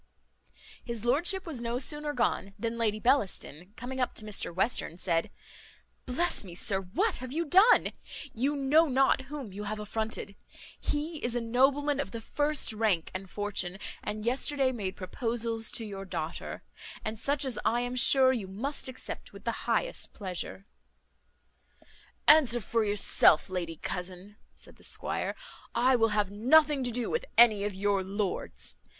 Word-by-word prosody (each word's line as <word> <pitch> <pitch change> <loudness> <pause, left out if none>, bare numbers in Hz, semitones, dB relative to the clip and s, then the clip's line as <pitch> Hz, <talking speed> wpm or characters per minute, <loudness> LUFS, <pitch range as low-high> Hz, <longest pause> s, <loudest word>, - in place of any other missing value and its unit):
His 235 -2 -4
lordship 345 +10 +2
was 300 -8 -5
no 235 0 -2
sooner 295 +3 -1
gone, 215 -6 -1
than 230 +2 -3
Lady 215 -2 +1
Bellaston, 200 - 0
coming 260 +2 -6
up 250 - -1
to 215 - -6
Mr 210 -4 -2
Western, 185 -2 -1
said, 170 -3 0 0.8
"Bless 340 +5 +1
me, 180 -3 -10
sir, 195 +1 +1
what 365 - 0
have 255 0 -7
you 330 +4 -1
done? 385 +9 +5 0.4
You 270 +6 0
know 290 +4 +4
not 265 -1 +2
whom 275 -9 -6
you 205 +2 -6
have 215 +1 -3
affronted; 210 -1 -3 0.4
he 300 +1 -3
is 240 0 0
a - - +1
nobleman 270 +5 +2
of 280 - -2
the 230 - -6
first 290 +3 +2
rank 210 -7 0
and 185 0 -6
fortune, 195 -2 -1 0.2
and 210 +1 -4
yesterday 265 +2 +2
made 200 -6 -4
proposals 225 +3 -2
to 225 - -1
your 195 -2 -6
daughter; 190 - -5 0.4
and 215 0 -4
such 280 +3 +1
as 245 -5 -1
I 240 +1 +2
am 245 +1 -3
sure 260 +1 +6
you 220 -7 -3
must 255 +11 -4
accept 260 0 -7
with - - -12
the - - -4
highest - - -1
pleasure." 190 0 -5 1.6
"Answer 275 -6 +6
for 230 +1 0
yourself, 205 -5 +4
lady 170 -3 -3
cousin," 180 +5 -6 0.2
said - - -12
the - - -20
squire, - - -1 0.4
"I 255 +2 +4
will 225 -2 +3
have 210 -2 0
nothing 280 +6 +4
to 245 - 0
do 240 0 -2
with 475 +1 -1
any 215 -4 +6
of 205 -2 -3
your 200 0 +1
lords. 195 0 -4
230 Hz, 160 wpm, -29 LUFS, 205-270 Hz, 1.6 s, sure